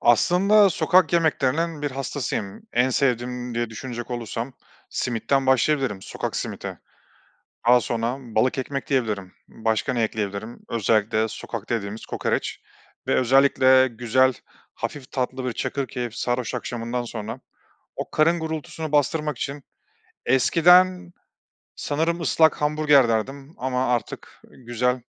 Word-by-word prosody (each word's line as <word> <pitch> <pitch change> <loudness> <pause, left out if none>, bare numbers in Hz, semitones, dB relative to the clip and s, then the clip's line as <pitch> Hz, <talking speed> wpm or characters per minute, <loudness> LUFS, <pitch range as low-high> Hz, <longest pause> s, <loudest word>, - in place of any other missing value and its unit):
Aslında 195 - +5
sokak 180 -1 +3
yemeklerinin 160 -1 +1
bir 145 - -1
hastasıyım. 125 -6 -4
En 125 +2 +2
sevdiğim 125 -1 -1
diye 120 -1 -2
düşünecek 120 +2 -7
olursam 120 +1 -4 0.4
simitten 125 +3 0
başlayabilirim, 130 -5 +2
sokak - - -4
simidi. - - -5 0.9
Daha 125 0 +7
sonra 115 +4 -2
balık 125 +2 0
ekmek 135 +1 -3
diyebilirim. 105 -9 -1 0.2
Başka 110 +4 -1
ne 120 -2 0
ekleyebilirim? 110 +1 -3
Özellikle 110 0 +1
sokakta 120 - -5
yediğimiz 105 0 -5
kokoreç - - -2 0.5
ve - - +1
özellikle 130 0 +5
güzel, 125 +2 +2 0.4
hafif 135 -3 -6
tatlı 130 0 -2
bir 125 - -1
çakırkeyif 125 -4 -3
sarhoş 125 0 -2
akşamından 120 0 -3
sonra 110 -3 -6 0.6
o - - -5
karın 165 +2 +3
gurultusunu 160 -1 -5
bastırmak 150 -1 +1
için 140 0 -5 0.6
eskiden 180 +7 +4 0.6
sanırım 165 +4 -1
ıslak 160 -2 +3
hamburger 150 -4 +4
derdim 135 +7 -2
ama 130 0 -1
artık 120 - -6
güzel 125 +1 -1
130 Hz, 115 wpm, -24 LUFS, 115-145 Hz, 0.9 s, Daha